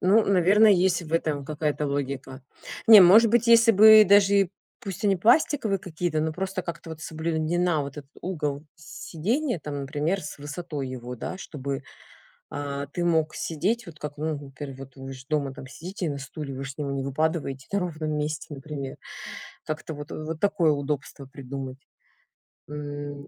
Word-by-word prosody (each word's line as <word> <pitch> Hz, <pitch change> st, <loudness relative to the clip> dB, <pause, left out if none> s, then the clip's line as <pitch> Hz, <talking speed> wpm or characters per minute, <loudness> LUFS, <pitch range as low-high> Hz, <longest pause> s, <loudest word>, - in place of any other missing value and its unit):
Ну 210 Hz, +4 st, +4 dB
наверно 200 Hz, +3 st, +5 dB
есть 185 Hz, -2 st, +3 dB
в 160 Hz, 0 st, -10 dB
этом 150 Hz, -4 st, 0 dB
какая-то 150 Hz, 0 st, -2 dB
логика. 140 Hz, -1 st, -4 dB, 0.4 s
Не 220 Hz, -2 st, +11 dB
может 210 Hz, +5 st, +7 dB
быть 235 Hz, 0 st, +3 dB
если 230 Hz, 0 st, +7 dB
бы 215 Hz, +1 st, +9 dB
даже 200 Hz, 0 st, +6 dB
и 190 Hz, -, 0 dB, 0.3 s
пусть 195 Hz, +2 st, -6 dB
они 195 Hz, -2 st, +3 dB
пластиковые 225 Hz, -, +3 dB
какие-то, 165 Hz, -2 st, -2 dB
но 160 Hz, 0 st, -1 dB
просто 190 Hz, +1 st, -3 dB
как-то 170 Hz, -1 st, -7 dB
вот 160 Hz, -, -8 dB
соблюдена 160 Hz, +1 st, 0 dB
вот 140 Hz, +1 st, -7 dB
этот 140 Hz, -1 st, -11 dB
угол 150 Hz, -5 st, -3 dB
сидения 210 Hz, -, -2 dB
там, 145 Hz, -1 st, -5 dB
например, 150 Hz, +7 st, -1 dB
с 150 Hz, -, -8 dB
высотой 145 Hz, -1 st, -5 dB
его 125 Hz, -1 st, -6 dB
да, 185 Hz, -, -5 dB
чтобы, 140 Hz, -5 st, -5 dB, 0.7 s
а, 140 Hz, 0 st, -4 dB
ты 175 Hz, +4 st, -3 dB
мог 160 Hz, -2 st, +2 dB
сидеть, 205 Hz, +8 st, -1 dB
вот 155 Hz, -2 st, -11 dB
как, 150 Hz, 0 st, -6 dB
ну 155 Hz, 0 st, -2 dB
например, 135 Hz, 0 st, -8 dB
вы 135 Hz, 0 st, -8 dB
ж 130 Hz, 0 st, -12 dB
дома 145 Hz, -3 st, 0 dB, 0.2 s
сидите 175 Hz, +3 st, -5 dB
на 140 Hz, -, -3 dB
стуле, 140 Hz, 0 st, -7 dB
вы 135 Hz, -, -5 dB
же 135 Hz, -, -5 dB
с 140 Hz, -, -18 dB
него 140 Hz, -2 st, -3 dB
не 135 Hz, -1 st, -2 dB
выпадываете 140 Hz, -1 st, -2 dB
на 200 Hz, -, +1 dB
ровном 155 Hz, -4 st, -3 dB
месте, 150 Hz, +1 st, -3 dB
например. 140 Hz, -1 st, -6 dB, 0.7 s
Как-то 155 Hz, +1 st, -4 dB
вот 145 Hz, 0 st, -8 dB
вот 155 Hz, +1 st, -5 dB
такое 200 Hz, -6 st, +3 dB
удобство 140 Hz, -1 st, -3 dB
придумать. 135 Hz, -1 st, -7 dB, 0.9 s
М, 145 Hz, -1 st, -6 dB
155 Hz, 170 wpm, -26 LUFS, 140-180 Hz, 0.9 s, Не